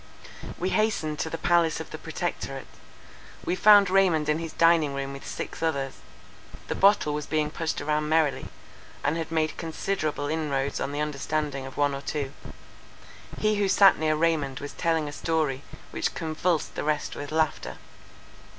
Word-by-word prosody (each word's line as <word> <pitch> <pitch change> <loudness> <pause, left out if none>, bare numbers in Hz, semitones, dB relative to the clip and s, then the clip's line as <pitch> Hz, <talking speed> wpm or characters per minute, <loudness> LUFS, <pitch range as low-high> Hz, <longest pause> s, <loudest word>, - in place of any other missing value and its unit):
We 185 - -1
hastened 180 -9 0
to 160 - -1
the 165 - -4
palace 170 -2 +2
of - - -8
the - - -7
Protectorate. - - -4 0.8
We 180 - 0
found 205 +1 +7
Raymond 180 -5 +3
in 150 +1 +2
his 165 -1 -5
dining 165 -4 +3
room 140 0 -4
with 140 - -9
six - - -6
others: 140 -5 -1 0.7
the - - +1
bottle 195 -6 +4
was 150 0 -4
being 155 -1 0
pushed 160 0 -2
about 150 +1 0
merrily, 155 -1 +1 0.6
and 145 +3 +1
had 165 -1 -4
made 160 -1 0
considerable 160 -3 -2
inroads 145 -3 -1
on 140 - -2
the 145 +1 -2
understanding 150 -2 -2
of 135 - -11
one 145 -1 +2
or 135 - -4
two. 140 -2 -3 1.0
He 215 -1 +1
who 200 -1 +1
sat 195 -3 +6
near 155 -1 +2
Raymond 155 -4 0
was 145 - -7
telling 165 -3 0
a - - -5
story, 155 -5 -1 0.3
which - - -2
convulsed 160 +1 -1
the - - -4
rest 150 0 -1
with 145 0 -6
laughter. 160 -1 -1
155 Hz, 170 wpm, -26 LUFS, 145-165 Hz, 1.0 s, found